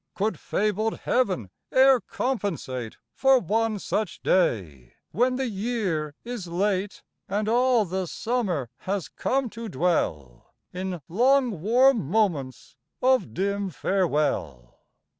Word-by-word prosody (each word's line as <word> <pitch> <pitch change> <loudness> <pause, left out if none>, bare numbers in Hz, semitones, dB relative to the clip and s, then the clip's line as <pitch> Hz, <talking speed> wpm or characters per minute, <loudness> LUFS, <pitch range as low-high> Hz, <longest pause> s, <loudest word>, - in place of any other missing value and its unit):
Could 215 +3 -1
fabled 215 +2 -1
Heaven 185 - 0 0.2
e'er 265 0 +6
compensate 170 - -3 0.2
For 270 0 +4
one 225 +1 0
such 210 +2 -3
day, 90 - 0 0.2
when 250 +7 +2
the 265 0 -1
year 195 -9 -2
is 235 -6 -6
late, 190 +3 -1 0.3
And 205 +2 -1
all 245 -1 +3
the 185 0 -3
Summer 185 - -2
has 195 -2 -3
come 270 0 -1
to 230 -1 -7
dwell 80 - -2 0.2
In 180 -2 -4
long 245 - +2
warm 245 +5 +4
moments 170 -11 -1 0.2
of 255 - +2
dim 200 0 -1
farewell? 145 - -1
200 Hz, 115 wpm, -25 LUFS, 165-235 Hz, 0.3 s, e'er